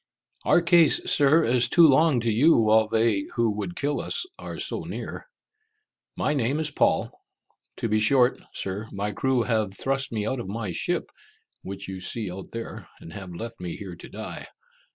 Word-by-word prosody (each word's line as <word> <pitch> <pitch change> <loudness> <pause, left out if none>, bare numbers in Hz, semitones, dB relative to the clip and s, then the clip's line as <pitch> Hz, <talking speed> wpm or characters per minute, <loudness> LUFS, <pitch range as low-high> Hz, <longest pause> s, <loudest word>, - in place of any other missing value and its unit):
"Our 175 - +4
case, 170 -3 +5
Sir, 150 +3 +5
is 120 -1 +2
too 170 +4 +6
long 145 -2 +4
to 115 0 0
you 145 +10 +5
while 110 -1 +4
they 110 -3 +1
who 115 -2 +2
would 100 -4 -5
kill 145 0 -1
us - - -1
are - - -7
so - - -2
near. - - -7 0.9
My 150 - 0
name 135 +1 0
is 155 -2 -1
Paul. - - +1 0.7
To - - -2
be 110 0 +2
short, 125 +3 +3
Sir, 100 +3 -4
my 100 +1 -3
crew 130 +3 +1
have 110 -5 -1
thrust 135 0 -1
me 105 -3 -2
out 130 +3 -2
of 115 - -6
my 105 -1 -4
ship, - - -2 0.5
which 100 0 -7
you 95 -1 -6
see 100 +1 -4
out 95 +1 -8
there, 115 0 -7
and 80 - -11
have 95 -4 -8
left 115 +6 -7
me 90 -2 -5
here 95 -4 -8
to - - -11
die. - - -7
115 Hz, 185 wpm, -25 LUFS, 100-135 Hz, 0.9 s, too